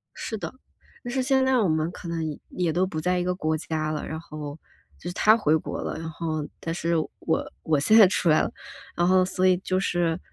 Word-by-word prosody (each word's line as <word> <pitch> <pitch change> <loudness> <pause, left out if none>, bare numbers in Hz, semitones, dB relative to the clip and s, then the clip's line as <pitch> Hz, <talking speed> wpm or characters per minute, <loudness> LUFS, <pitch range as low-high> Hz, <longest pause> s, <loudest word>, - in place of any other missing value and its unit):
是 220 - -4
的， - - -6 0.5
但 245 - -5
是 265 - +1
现 265 0 +2
在 260 -1 +3
我 210 -5 +3
们 155 0 +1
可 175 - -9
能 165 -1 -2 0.3
也 175 -3 -1
都 185 +2 +2
不 160 -4 -4
在 180 +2 +1
一 - - 0
个 180 0 0
国 155 -2 0
家 155 -1 -2
了， 155 - -3
然 160 0 -4
后 150 -2 -7 0.4
就 175 - -6
是 - - -5
他 215 +3 +5
回 160 -6 +3
国 - - -5
了， - - -4
然 165 0 -5
后， 155 -1 -3
但 165 - -3
是 170 0 0 0.2
我 160 - -1
我 155 -2 +2
现 215 +10 +5
在 205 -4 +9
出 180 -2 +1
来 155 - +5
了， - - -2 0.4
然 175 +1 +2
后 185 0 +5
所 185 0 0
以 180 -1 +4
就 185 0 -1
是 175 -3 0
170 Hz, 255 characters per minute, -25 LUFS, 160-185 Hz, 0.5 s, 在